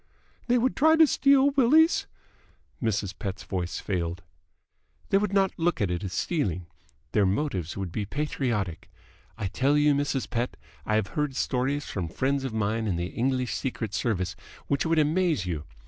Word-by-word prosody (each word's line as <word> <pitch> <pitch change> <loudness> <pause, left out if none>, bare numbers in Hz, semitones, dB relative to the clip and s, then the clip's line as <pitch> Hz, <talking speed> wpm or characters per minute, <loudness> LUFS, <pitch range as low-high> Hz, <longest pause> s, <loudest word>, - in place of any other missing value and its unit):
"They 245 0 +4
would 250 +2 +1
try 315 +3 +5
to 320 0 +7
steal 275 -1 +4
Willie's 290 +5 +4 0.4
?" - - -36
Mrs. 105 -4 -1
Pett's 95 0 -4
voice 90 -2 -3
failed. 90 -2 -3 0.9
"They 195 - +4
would 210 -1 -1
not 195 -1 +3
look 175 +1 +1
on 100 -4 0
it 90 +1 -2
as 95 - -4
stealing. 90 - -1 0.5
Their 100 -2 +3
motives 95 - -2
would 95 -3 -4
be 105 +1 -3
patriotic. 120 - -2 0.5
I 105 - -3
tell 135 +9 +2
you, 150 0 +4
Mrs. 140 -2 -1
Pett, 120 0 -2 0.3
I 110 - +2
have 110 - 0
heard 150 -4 -2
stories 135 +3 0
from 90 -4 -3
friends 135 - -1
of 135 - -3
mine 110 +1 -1
in 95 - 0
the 85 +1 -2
English 125 0 0
Secret 115 -6 -3
Service 95 -7 -1 0.3
which 140 +2 0
would 165 0 +2
amaze 155 - +2
you. 80 -4 -3
125 Hz, 175 wpm, -27 LUFS, 95-155 Hz, 0.9 s, to